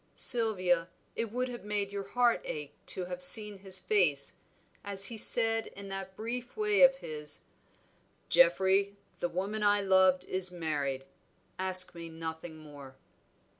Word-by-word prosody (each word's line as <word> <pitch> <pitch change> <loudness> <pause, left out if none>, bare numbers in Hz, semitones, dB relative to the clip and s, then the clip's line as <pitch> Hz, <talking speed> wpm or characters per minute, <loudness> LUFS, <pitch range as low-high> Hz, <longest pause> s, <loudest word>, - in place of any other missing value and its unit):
Sylvia, 185 -7 +4 0.3
it 230 -2 -5
would 250 +2 -4
have 240 -1 -10
made 205 -1 -5
your 200 0 -6
heart 240 +2 0
ache 145 -1 -8
to 185 - -3
have 180 0 -9
seen 210 +2 +5
his 190 -1 0
face, 175 -9 0 0.5
as 195 -1 +5
he 230 - -5
said 225 0 +4
in 200 0 -11
that 195 0 -8
brief 240 - -8
way 420 -1 -1
of 270 0 +5
his 150 - -2 0.9
'Geoffrey, 200 - +1 0.2
the 175 - -3
woman 195 +5 -5
I 205 0 +1
loved 190 -1 +1
is 185 -1 -2
married, 145 -6 -5 0.5
ask 185 -1 +5
me 170 -1 -10
nothing 160 0 -9
more.' 145 -4 -15
190 Hz, 145 wpm, -28 LUFS, 170-215 Hz, 0.9 s, seen